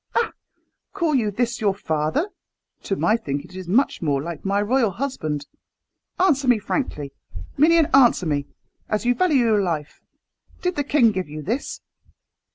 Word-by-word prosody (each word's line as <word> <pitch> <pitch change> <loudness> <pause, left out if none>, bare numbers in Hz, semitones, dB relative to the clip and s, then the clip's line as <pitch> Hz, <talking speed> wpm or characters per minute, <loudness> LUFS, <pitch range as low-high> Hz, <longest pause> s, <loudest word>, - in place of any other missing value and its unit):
"Ah! 470 -1 +2 0.6
call 330 -3 0
you 235 -6 +2
this 235 +3 -2
your 200 -3 +2
father? 160 - -1 0.6
To 195 - 0
my 215 - +2
thinking 145 -6 -4
it - - -13
is 185 -2 -7
much 240 +10 +2
more 145 -4 +1
like 165 +2 -6
my 200 +1 +1
royal 230 +2 +2
husband. 155 - -3 0.7
Answer 290 -8 +3
me 245 -2 +5
frankly, 170 - -3 0.4
minion 325 +2 +5
answer 245 -8 +5
me, 145 -2 -1 0.4
as 215 +2 -1
you 245 - +4
value 290 -5 +3
your 215 -3 +3
life! 160 -6 -3 0.6
Did 360 0 0
the 290 - 0
king 275 -5 +4
give 185 -5 -3
you 150 0 -7
this?" 235 - -3
215 Hz, 165 wpm, -23 LUFS, 165-270 Hz, 0.7 s, me